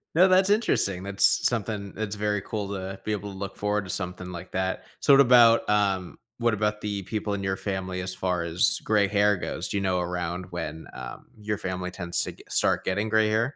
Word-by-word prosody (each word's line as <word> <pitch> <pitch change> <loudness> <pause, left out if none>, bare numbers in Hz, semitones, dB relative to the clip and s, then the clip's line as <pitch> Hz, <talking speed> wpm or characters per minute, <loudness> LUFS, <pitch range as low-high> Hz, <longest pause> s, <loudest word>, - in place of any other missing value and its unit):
No. 185 +3 +7
That's 190 +1 +4
interesting. 100 - +1
That's 100 0 +3
s - - +4
something 105 -4 -3
it's 105 -1 -3
very 105 -1 -1
cool 100 -1 -4
uh 95 0 -5
to - - -17
be 110 - -3
able 100 -1 -3
to 95 - -10
look 100 0 -5
forward 105 -1 -1
to - - -10
something 90 -1 -4
like 85 - -8
that. 95 0 -2 0.2
So, 140 - +5
what 140 - +8
about 120 -4 +6
um, 100 -3 +1 0.2
what 120 -1 +1
about 105 0 -1
the 100 -2 -3
people 105 +1 -3
in 100 -1 -3
your 95 0 0
family 95 -2 -3
as 90 0 -4
far 90 -2 -1
as 85 +2 +2
gray 105 -2 +3
hair 105 -1 +3
goes? - - -4
Do 100 - -1
you - - 0
know 95 -1 +1
around 90 0 -3
when 80 -2 -5
um 60 -1 -9
your 105 -1 -2
family 90 -1 -4
tends 85 -2 -3
to - - -4
get - - -17
start - - +3
getting 105 +3 -1
gray 110 0 +3
hair? 115 +6 0
100 Hz, 230 wpm, -26 LUFS, 90-105 Hz, 0.2 s, what